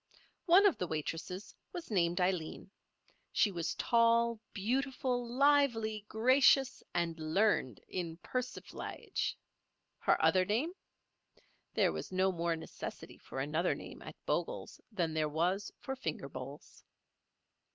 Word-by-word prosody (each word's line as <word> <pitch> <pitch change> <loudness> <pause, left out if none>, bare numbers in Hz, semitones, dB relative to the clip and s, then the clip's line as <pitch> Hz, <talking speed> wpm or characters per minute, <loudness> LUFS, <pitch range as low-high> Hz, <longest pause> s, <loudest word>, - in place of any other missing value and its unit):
One 370 +4 +7
of 400 - +4
the 180 - -1
waitresses 165 +5 -4 0.2
was 350 -9 -6
named 175 -2 +2
Aileen. 180 0 -1 0.6
She 210 - +3
was 170 -3 -2
tall, 230 -1 +3
beautiful, 250 +3 -1
lively, 240 -6 +3
gracious 265 +3 +4
and 170 -2 -1
learned 155 - +1
in 170 -3 -4
persiflage. 255 +7 -4 0.6
Her - - +3
other 185 -1 +4
name? 230 - 0 1.0
There - - +4
was - - -5
no 190 +1 +2
more 170 -1 0
necessity 160 - -8
for 130 - -7
another 155 +6 +1
name - - -9
at - - -9
Bogle's - - -2
than 170 -6 -1
there 155 -1 +1
was 180 +6 0
for 265 - -5
finger 265 - -4
bowls. - - -9
200 Hz, 120 wpm, -34 LUFS, 170-245 Hz, 1.0 s, One